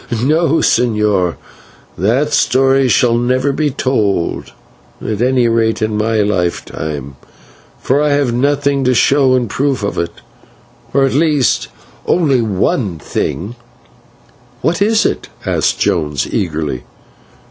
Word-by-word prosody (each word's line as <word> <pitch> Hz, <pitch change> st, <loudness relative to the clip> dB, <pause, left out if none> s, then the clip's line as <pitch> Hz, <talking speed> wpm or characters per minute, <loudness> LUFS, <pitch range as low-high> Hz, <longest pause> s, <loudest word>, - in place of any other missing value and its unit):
No, 160 Hz, +4 st, +2 dB
señor, 105 Hz, -7 st, +1 dB, 0.6 s
that 125 Hz, -, 0 dB
story 135 Hz, 0 st, +3 dB
shall 120 Hz, -1 st, +3 dB
never 130 Hz, +3 st, +1 dB
be 150 Hz, +2 st, 0 dB
told, 110 Hz, -10 st, -1 dB, 0.5 s
at 110 Hz, 0 st, -4 dB
any 125 Hz, -1 st, +2 dB
rate 115 Hz, -1 st, +1 dB
in 110 Hz, -1 st, -1 dB
my 110 Hz, +1 st, +1 dB
lifetime, 80 Hz, -8 st, -3 dB, 0.6 s
for 140 Hz, +3 st, +1 dB
I 150 Hz, -, +2 dB
have 140 Hz, -4 st, +1 dB
nothing 140 Hz, +2 st, +1 dB
to 125 Hz, 0 st, +2 dB
show 135 Hz, +1 st, +3 dB
in 125 Hz, -2 st, 0 dB
proof 135 Hz, +2 st, -1 dB
of 100 Hz, -, -2 dB
it, 85 Hz, 0 st, -3 dB, 0.8 s
or 140 Hz, -, +2 dB
at 135 Hz, -, -1 dB
least 150 Hz, -3 st, +1 dB, 0.4 s
only 140 Hz, -8 st, +2 dB
one 100 Hz, -2 st, -1 dB
thing 100 Hz, -, -4 dB, 0.5 s
" 120 Hz, 0 st, -31 dB
"What 170 Hz, +3 st, 0 dB
is 215 Hz, +1 st, +3 dB
it?" -, -, -2 dB, 0.2 s
asked -, -, 0 dB
Jones, 75 Hz, -4 st, 0 dB
eagerly. 75 Hz, -7 st, -2 dB
120 Hz, 125 wpm, -15 LUFS, 100-140 Hz, 0.8 s, story